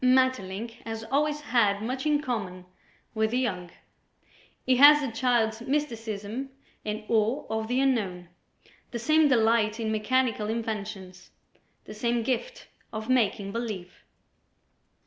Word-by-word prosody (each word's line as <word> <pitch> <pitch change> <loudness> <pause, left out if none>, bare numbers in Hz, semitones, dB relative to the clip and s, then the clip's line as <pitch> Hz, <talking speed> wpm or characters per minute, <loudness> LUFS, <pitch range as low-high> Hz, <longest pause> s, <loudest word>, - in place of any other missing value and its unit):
Maeterlinck 240 -4 +1
has 225 0 -5
always 300 +2 +1
had 215 -7 +2
much 260 +5 -2
in 295 -1 +2
common 190 -8 -4 0.5
with 220 -1 +1
the 245 - -1
young. 185 -9 -2 1.0
He 255 -1 +3
has 290 +3 +9
the 265 -6 -4
child's 230 -2 +1
mysticism 235 -3 -3 0.3
and 215 +1 -4
awe 225 +3 +1
of 220 0 -2
the 250 +2 0
unknown, 195 -10 0 0.6
the 240 - -4
same 310 +6 +4
delight 225 -3 +2
in 220 -1 -1
mechanical 220 0 0
inventions, 210 -5 -5 0.6
the - - -9
same 235 +2 0
gift - - -3 0.2
of 220 +1 -6
"making 205 -5 +1
believe." 210 -6 -6
230 Hz, 125 wpm, -27 LUFS, 215-255 Hz, 1.0 s, has